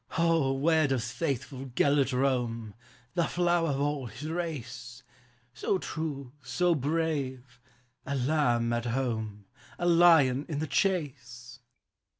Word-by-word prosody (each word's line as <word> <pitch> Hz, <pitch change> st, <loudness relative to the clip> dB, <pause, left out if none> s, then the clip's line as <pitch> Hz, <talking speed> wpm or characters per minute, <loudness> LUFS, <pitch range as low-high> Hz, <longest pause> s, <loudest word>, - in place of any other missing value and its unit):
"O, 165 Hz, -5 st, +3 dB
where 155 Hz, +2 st, +3 dB
does 125 Hz, -4 st, -1 dB
faithful 135 Hz, -3 st, -3 dB
Gelert 140 Hz, 0 st, +3 dB
roam, 120 Hz, -4 st, -1 dB, 0.4 s
The 170 Hz, -, +1 dB
flower 175 Hz, -2 st, +1 dB
of 140 Hz, -1 st, -1 dB
all 145 Hz, -2 st, -1 dB
his 125 Hz, +8 st, -7 dB
race; 125 Hz, -8 st, -5 dB, 0.5 s
So 190 Hz, -, 0 dB
true, 145 Hz, -7 st, -5 dB
so 180 Hz, +2 st, +1 dB
brave, 140 Hz, -5 st, -2 dB, 0.2 s
— 125 Hz, 0 st, -42 dB
a 140 Hz, -, -1 dB
lamb 125 Hz, -4 st, +1 dB
at 120 Hz, 0 st, -1 dB
home 110 Hz, -5 st, -2 dB, 0.3 s
A 175 Hz, -, -2 dB
lion 165 Hz, -6 st, +5 dB
in 150 Hz, -, -2 dB
the 155 Hz, -, -1 dB
chase? 125 Hz, -, -2 dB
135 Hz, 130 wpm, -29 LUFS, 125-160 Hz, 0.5 s, lion